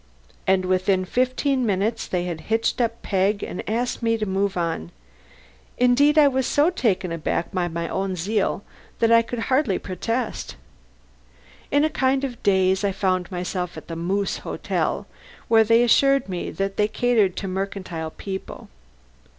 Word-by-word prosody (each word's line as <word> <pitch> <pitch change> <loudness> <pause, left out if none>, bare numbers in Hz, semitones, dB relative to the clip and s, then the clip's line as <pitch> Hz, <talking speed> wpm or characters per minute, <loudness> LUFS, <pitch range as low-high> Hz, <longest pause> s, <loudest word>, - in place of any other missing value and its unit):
And 190 -1 +3
within 185 0 +1
fifteen 255 +4 0
minutes 215 +2 0
they 180 -1 -1
had 170 -3 -4
hitched 225 +2 +1
up 230 -1 -1
Peg 200 +1 +1
and - - -4
asked 240 +3 -1
me 230 -1 +1
to 215 - -2
move 195 0 -1
on. 165 - -2 0.9
Indeed 270 +5 +4
I 300 -2 +7
was 265 -2 0
so 300 +5 +3
taken 200 - 0
aback 165 +1 -2
by 180 -2 0
my 170 0 -3
own 190 +1 -2
zeal 200 +3 -1 0.3
that 230 0 +2
I 230 0 +7
could 235 +1 -6
hardly 255 -3 +1
protest. 230 +6 -3 1.1
In 285 +1 +3
a 310 - +3
kind 265 0 +1
of 250 -4 -4
daze 190 0 +2
I 200 - +2
found 185 -1 -1
myself 180 0 -3
at - - -10
the 165 - -4
Moose 190 +4 -1
Hotel, - - -2 0.4
where 225 -1 +6
they 230 +2 +4
assured 275 +2 +4
me 180 -2 -4
that 195 0 -3
they 210 - +3
catered 220 -4 +2
to 195 - -4
mercantile 185 -4 -4
people. 190 +4 -7
200 Hz, 160 wpm, -23 LUFS, 185-240 Hz, 1.1 s, I